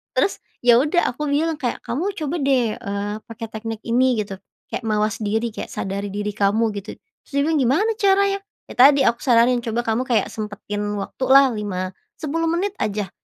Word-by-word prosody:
Terus, 395 - +1 0.2
ya, 240 -1 +6
udah 305 +4 +2
aku 300 +4 -4
bilang 305 +2 0
kayak, 250 -4 -3
"Kamu 365 +11 -2
coba, 315 -2 -3
deh, 260 -6 +2
eee, 200 +1 -3
pakai 230 0 -7
teknik 225 0 -6
ini 250 +2 +2
gitu, 195 -1 -8 0.3
kayak - - -4
mawas 215 +1 0
diri 220 +2 -1
kayak - - -6
sadari 200 +1 -3
diri 205 +1 -3
kamu 210 +2 +1
gitu." 200 - -9 0.3
Terus - - -24
dia 280 - +3
bilang, 320 -2 +2
"Gimana 280 - +2
caranya?" 395 0 +3 0.3
"Ya, - - -7
tadi 275 +2 +7
aku 235 - +2
saranin, 245 0 +4
coba 230 +1 0
kamu 230 +1 0
kayak 240 -3 +1
sempetin 210 -1 -5 0.2
waktu 260 - -6
lah 270 +1 +7
5, 185 -3 -3 0.3
10 325 +2 -1
menit 380 +4 -1
aja, 205 -2 -2
235 Hz, 185 wpm, -22 LUFS, 210-285 Hz, 0.3 s, tadi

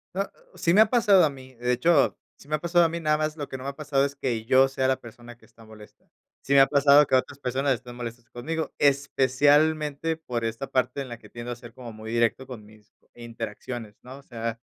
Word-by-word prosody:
Ah, 195 +1 -2 0.2
sí 170 - +1
me 210 - +7
ha 220 - +6
pasado 210 -6 +5
a 155 - +3
mí, 130 -2 -12
de 125 +1 -2
hecho, 140 +4 +2 0.2
sí - - -19
me 155 - 0
ha - - -4
pasado 175 +2 +3
a 165 - +2
mí, 170 +1 -4
nada 155 -2 +1
más 155 +1 -2
lo 145 - -5
que 130 - -7
no 130 - -10
me 135 - -3
ha 140 - -8
pasado 145 -2 0
es 140 0 -5
que, 120 -5 -3
yo 130 +2 +5
sea 135 -1 -1
la 130 - +1
persona 120 +1 -13
que - - -22
está 115 -1 -19
molesta. 105 -1 -16 0.3
Sí 140 - -1
me 140 - +7
ha 135 - +6
pasado 140 +1 +5
que - - -7
otras 135 +2 -1
personas 135 +1 0
estén 120 +1 -11
molestas 120 0 -8
conmigo, 160 +6 -4
especialmente 145 +3 +2
por 120 -7 -4
esta 115 +3 -4
parte 130 +2 0
en 135 - -7
la 120 -1 -8
que - - -16
tiendo 120 +1 -7
a - - -4
ser 120 0 -13
como 120 -3 -9
muy 110 +1 -9
directo 120 +2 0
con 120 -5 -10
mis 105 0 -20 0.2
interacciones, 115 -1 -8
¿no?, 130 +2 -10
o 140 - -15
sea, 115 -2 -5
130 Hz, 250 wpm, -25 LUFS, 120-145 Hz, 0.3 s, me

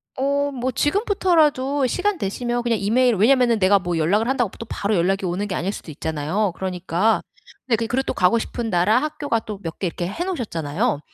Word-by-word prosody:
어 280 +2 0
뭐 260 -1 -2
지금부터라도 295 - +2
시간 395 +7 0
되시면 240 +2 -2
그냥 235 -3 0
이메일 240 +4 +3
왜냐하면은 235 +2 +4
내가 195 +1 +5
뭐 175 -2 -2
연락을 200 +8 +2
한다고 245 -5 +1
또 230 - -6
바로 205 +1 -1
연락이 190 +3 +1
오는 180 +3 -2
게 190 - -4
아닐 190 +4 -1
수도 160 - -8
있잖아요. 160 +6 -2
그러니까 185 +3 0 0.5
근데 240 - +3
그리고 245 +4 0
또 - - -1
가고 185 +6 +3
싶은 230 0 -4
나라, 180 +5 +3
학교가 295 -5 -1
또 210 -3 -7
몇 165 -3 -6
개 190 - 0
이렇게 175 +1 -4
해 330 - -3
놓으셨잖아요. 210 - -2
220 Hz, 435 characters per minute, -22 LUFS, 185-260 Hz, 0.5 s, 내가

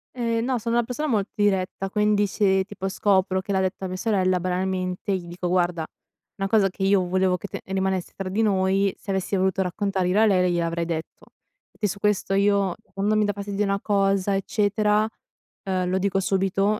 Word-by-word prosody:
Ehm 230 -2 0
no, 255 +1 0
sono 230 +1 -2
una 240 - +3
persona 255 +6 -3
molto 215 -6 0
diretta, 195 -2 0
quindi 210 0 +2
se, 190 -1 +2
tipo, 195 -1 -5
scopro 190 -1 +1
che 195 - -6
l'ha 190 - +2
detta 190 0 -2
mia 185 - -5
sorella, 185 -2 +1
banalmente, 185 +1 -1
gli 175 -2 -6
dico: 175 +1 -4
"Guarda 175 -2 +1 0.5
una 195 -1 -2
cosa 205 -2 +3
che 190 +1 -6
io 195 -1 +3
volevo 185 0 +2
che 200 - -7
te - - -6
rimanesse 190 -1 -2
tra 195 - -5
di 200 +4 0
noi, 195 -1 +2
se 200 - -6
avessi 190 +1 -1
voluto 190 +1 +1
raccontare 190 0 -1
io 185 +3 +2
a 220 - +6
lei 180 -4 +3
gliel'avrei 170 0 -1
detto." 165 -1 -5 0.5
E - - -28
che 210 - 0
su 200 +1 -5
questo 210 -2 0
io 200 -2 +2 0.2
quando 205 +2 +1
mi 215 - +3
dà 205 - 0
fastidio 200 +1 -2
una 200 0 0
cosa 195 -1 +1
eccetera, 210 +2 +1 0.6
ehm, 185 -2 -1
lo 185 +1 +1
dico 195 0 +1
subito 195 +2 +1
195 Hz, 200 wpm, -24 LUFS, 185-205 Hz, 0.6 s, a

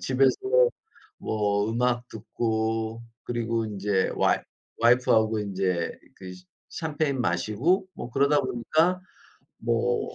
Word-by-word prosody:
집에서 130 0 +3 0.8
뭐 105 0 0
음악 120 +1 0
듣고 110 0 -2 0.2
그리고 115 -1 -1
인제 100 -2 -1
와이 - - +3 0.4
와이프하고 115 -2 +4
인제 95 -4 -1 0.3
그 95 -1 -9 0.4
샤 160 - -3
샴페인 145 -3 -1
마시고 120 - +1
뭐 120 - -8
그러다 140 +3 +3
보니까 155 +9 +1 0.6
뭐 470 -2 -1
115 Hz, 225 characters per minute, -26 LUFS, 105-135 Hz, 0.8 s, 와이프하고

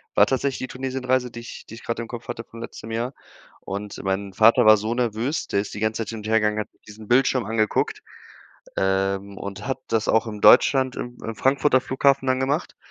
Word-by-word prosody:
war - - +7
tatsächlich 135 0 -1
die 130 - -4
Tunesienreise, 130 -1 -1
die 120 - -9
ich 120 - -10
die - - -10
ich 115 - -13
grad 115 - -3
im 115 - -4
Kopf 120 0 -8
hatte 115 -1 -5
vom 115 - -12
letztem 115 -1 -8
Jahr. 120 +4 -2 0.5
Und 100 +1 -6
mein 95 +1 -2
Vater 115 +5 +5
war 110 0 +8
so 110 +3 -2
nervös, 120 +4 -1
der 100 - 0
ist 100 - -4
die 105 - -6
ganze 110 +1 0
Zeit 105 - -9
hin 115 - -5
und 105 - -7
hergegangen, 105 -1 +2
hat 105 - -4 0.2
diesen 105 0 -12
Bildschirm 130 0 +3
angeguckt, 110 -1 0 0.8
ähm, 95 +1 0
und 100 +2 -7
hat 135 - -2
das 110 -1 0
auch 110 0 +3
im 105 -2 -6
Deutschland 130 +5 +5
im 120 0 -6
im 115 - -4
Frankfurter 135 +1 +3
Flughafen 135 +1 +2
dann 130 0 +1
gemacht. 140 +5 -1
115 Hz, 215 wpm, -23 LUFS, 105-130 Hz, 0.8 s, war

